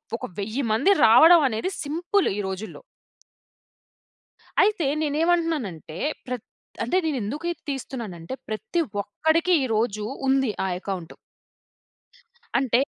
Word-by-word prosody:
ఒక 245 - -5
1000 220 +7 -2
మంది 230 - +3
రావడం 320 +10 +8
అనేది 225 +11 -2
సింపులు 345 +6 0
ఈ - - -2
రోజుల్లో. 190 - -6 1.8
అయితే 410 -7 +2 0.2
నేనేమంటున్నానంటే 300 - 0 0.3
ప్రత్ 250 -2 -5 0.4
అంటే 245 +11 +1
నేనెందుకు 285 +2 -2
ఇది 345 - -9
తీస్తున్నానంటే 235 -8 -5 0.2
ప్రతి 275 +10 -1 0.2
ఒక్కడికి 320 - +1
ఈరోజు 220 -3 0 0.2
ఉంది 265 -3 +3
ఆ - - 0
ఎకౌంటు. 185 -4 -6 1.4
అంటే 255 -2 +2
260 Hz, 100 wpm, -24 LUFS, 215-325 Hz, 1.8 s, రావడం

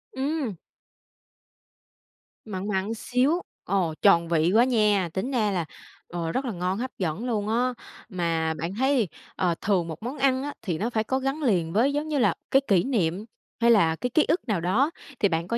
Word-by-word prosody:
Ừm. 270 - -2 1.9
Mặn 195 -1 -4
mặn 200 +1 -1
xíu, 255 +9 +1 0.2
ồ, 180 -4 0
tròn 170 -4 +5
vị 165 +1 +2
quá 235 - +7
nha. 210 -7 +2
Tính 235 +8 -2
ra 215 -5 +1
là, 175 -4 -1 0.4
ờ, 170 -2 -3
rất 260 +1 -1
là 240 - -2
ngon, 180 0 -2
hấp 255 +3 -3
dẫn 185 +5 -2
luôn 215 -4 -1
á. 250 +3 +1 0.4
Mà 165 -4 0
bạn 165 +4 -4
thấy, 260 -2 +2 0.3
ờ, 175 -2 +1
thường 185 -5 +1
một 160 +5 -7
món 255 +5 -4
ăn 265 -1 +2
á, 290 0 -4
thì 175 -6 -2
nó 220 +7 -1
phải 220 -2 0
có 260 +4 -1
gắn 270 +3 -2
liền 175 - +1
với 250 +7 +3
giống 295 +2 -1
như 300 -2 -1
là 240 - +3 0.2
cái 270 - +5
kỷ 190 -4 +4
niệm, 205 -6 0 0.4
hay 235 0 +6
là 165 -8 +4
cái 250 - -3
ký 300 +5 +3
ức 325 -2 0
nào 205 -7 0
đó, 225 - +2 0.3
thì 200 - +3
bạn 165 0 -1
có 235 - -1
215 Hz, 200 wpm, -26 LUFS, 175-255 Hz, 1.9 s, quá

